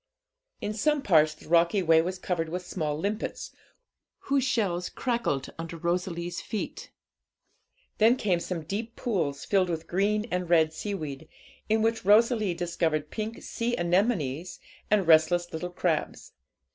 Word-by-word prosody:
In 210 - -2
some 295 +6 +1
parts 155 - +4
the - - -16
rocky 170 +4 +3
way 160 -1 +5
was 185 +3 -3
covered 175 -3 -2
with 180 +2 -4
small 155 -5 -2
limpets, 205 +6 -3 0.7
whose 275 -1 +1
shells 195 -9 0
crackled 235 - -2
under 165 0 -6
Rosalie's 175 0 -2
feet; 215 - -5 1.1
then 225 +3 +6
came 195 -8 +1
some 170 -2 -4
deep 220 +8 -4
pools 165 - -2
filled 190 -3 +2
with 165 -1 -3
green 210 +4 +1
and 180 -1 -2
red 160 -2 +4
seaweed, 160 -6 -5 0.4
in 220 0 +3
which 225 0 0
Rosalie 215 -1 +4
discovered 165 -3 -1
pink 220 +1 -5
sea 240 +1 -2
anemones 175 - 0 0.3
and 205 -3 +3
restless 175 +2 +4
little 180 +3 -3
crabs. 175 -3 -2
180 Hz, 140 wpm, -27 LUFS, 165-210 Hz, 1.1 s, then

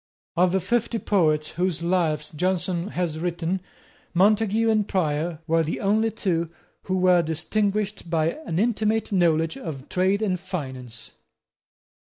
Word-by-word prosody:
Of 180 +1 +3
the 190 - +2
fifty 235 +4 0
poets 155 -8 +1
whose 175 -2 -1
lives 165 -4 0
Johnson 180 +2 -1
has 175 -6 -2
written, 175 +2 -2 0.5
Montague 215 +3 +3
and 215 -2 +2
Prior 160 -2 -1
were 165 0 +2
the 160 - -3
only 215 +3 +2
two 170 -7 -1 0.4
who 185 0 0
were 180 -1 +5
distinguished 200 +5 -1
by 165 -1 +2 0.2
an 160 - -2
intimate 220 +1 +1
knowledge 165 -4 +2
of 140 -4 -7
trade 190 +3 +1
and 185 -4 0
finance. 130 - -6
180 Hz, 135 wpm, -24 LUFS, 160-200 Hz, 0.5 s, were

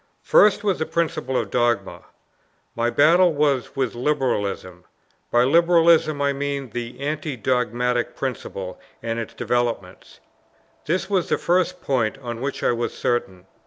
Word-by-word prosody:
First 210 0 +4
was 200 -3 0
the 160 - -2
principle 160 -6 -1
of - - -2
dogma: 120 -1 0 0.7
my 115 0 +1
battle 170 +7 +5
was 140 -4 0
with 130 -3 -1
liberalism; 120 -9 -2 0.5
by 120 0 +3
liberalism 165 0 +4
I 140 0 +2
mean 140 -2 -4
the 120 +2 -6
anti 150 0 -3
dogmatic 125 0 0
principle 100 -8 -5 0.2
and 115 0 -2
its 115 - -6
developments. 120 -7 -3 0.7
This 185 +4 0
was 190 -3 0
the - - +2
first 180 0 0
point 120 -5 0
on 120 -3 -7
which 140 +1 -4
I - - +3
was 120 0 -3
certain. 95 -7 -2
130 Hz, 140 wpm, -22 LUFS, 120-155 Hz, 0.7 s, battle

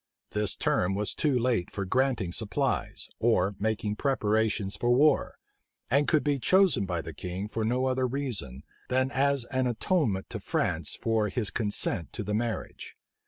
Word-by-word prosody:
This 105 -2 0
term 95 +2 +1
was 105 +1 -1
too 145 -4 +1
late 120 -7 +1
for 100 - -4
granting 125 -4 +1
supplies, 115 +6 -2
or 100 -4 +2
making 105 0 -1
preparations 110 -6 +1
for 120 - -1
war; 140 +4 +3 0.5
and 140 +3 +3
could 155 -3 +3
be 145 -2 +1
chosen 185 - +3
by 85 -3 -2
the 80 - -7
king 90 +5 -5
for 110 +1 -3
no 125 +4 +1
other 130 0 +1
reason, 115 - -3 0.3
than 130 +1 +1
as 140 -2 +2
an 130 -1 +2
atonement 120 - 0
to - - -4
France - - -1
for 110 -2 0
his 105 -1 -2
consent 105 -5 -1
to 110 - -4
the 105 +1 -3
marriage. 115 +1 -4
115 Hz, 165 wpm, -28 LUFS, 100-130 Hz, 0.5 s, war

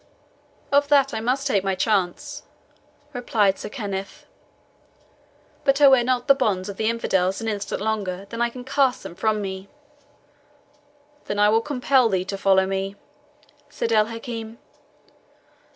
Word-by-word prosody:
"Of 285 0 +4
that 280 -1 +3
I - - -2
must 255 +5 -1
take 205 -9 +1
my 195 -1 0
chance," 215 +9 -1 0.7
replied 215 -6 +1
Sir - - -6
Kenneth; 200 -5 -6 1.4
"but 275 -1 +2
I 290 - +8
wear 260 -2 +5
not 250 0 0
the 275 - +8
bonds 210 -8 -1
of 200 - -7
the 220 0 +1
infidels 190 -5 0
an 225 - -4
instant 205 -2 -3
longer 200 -3 -2
than 230 0 -4
I 235 - +2
can 245 +1 -9
cast 265 -1 +1
them - - -8
from 215 +3 0
me." 190 0 -6 1.6
"Then 205 - -3
will 210 +2 +4
I 230 - -2
compel 260 -3 +3
thee 185 -2 0
to 195 - -4
follow 190 -1 +4
me," 195 +1 -3 0.7
said 230 - -3
El 215 -1 +4
Hakim. 230 -1 -7
220 Hz, 150 wpm, -23 LUFS, 195-250 Hz, 1.6 s, I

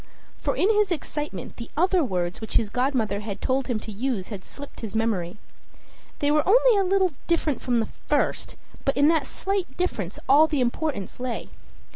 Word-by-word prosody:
For - - -1
in 375 - +3
his 420 -2 +3
excitement 295 - -4
the 235 - -7
other 360 +1 +3
words 180 -6 -2
which 220 - -4
his 210 -3 +2
godmother 245 -5 0
had 205 -1 -5
told 265 0 0
him 240 -4 0
to 220 - -7
use 215 -2 -2
had 200 -4 -6
slipped 285 0 -10
his 220 -2 -6
memory. 210 -5 0 0.8
They 290 0 +1
were 300 0 +4
only - - +6
a 400 - +3
little 380 -1 +3 0.2
different 325 -5 +1
from 245 -2 +1
the 225 - +1 0.2
first, - - 0 0.3
but 275 - 0
in 285 +2 +6
that 320 -4 +2
slight 390 -1 -2
difference 210 - -2
all 295 +4 +7
the 300 -3 -1
importance 250 -4 -1
lay. 250 -1 -4
265 Hz, 185 wpm, -25 LUFS, 215-325 Hz, 0.8 s, all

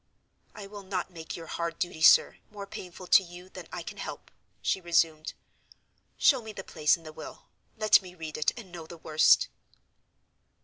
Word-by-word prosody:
"I 210 - -8
will 205 +1 -9
not 190 -1 -4
make 165 -2 -7
your 165 - -8
hard 170 +1 -4
duty, 175 -3 -3
sir, 165 - +6
more 205 -1 -8
painful 185 -2 -9
to 185 - +7
you 180 0 -12
than - - -10
I - - -5
can - - -9
help," - - -7 0.3
she 190 - 0
resumed. 165 -2 +1 0.8
"Show 265 -4 +4
me 220 -1 -8
the 195 - -7
place 155 -3 +2
in 165 - -19
the 155 -1 -10
will. - - -11 0.3
Let 215 -1 +5
me 180 -1 -12
read 160 -3 -7
it, 155 - +2
and 205 -7 -10
know 165 -2 -9
the 170 - -10
worst." 155 -1 +4
175 Hz, 185 wpm, -29 LUFS, 165-195 Hz, 0.8 s, to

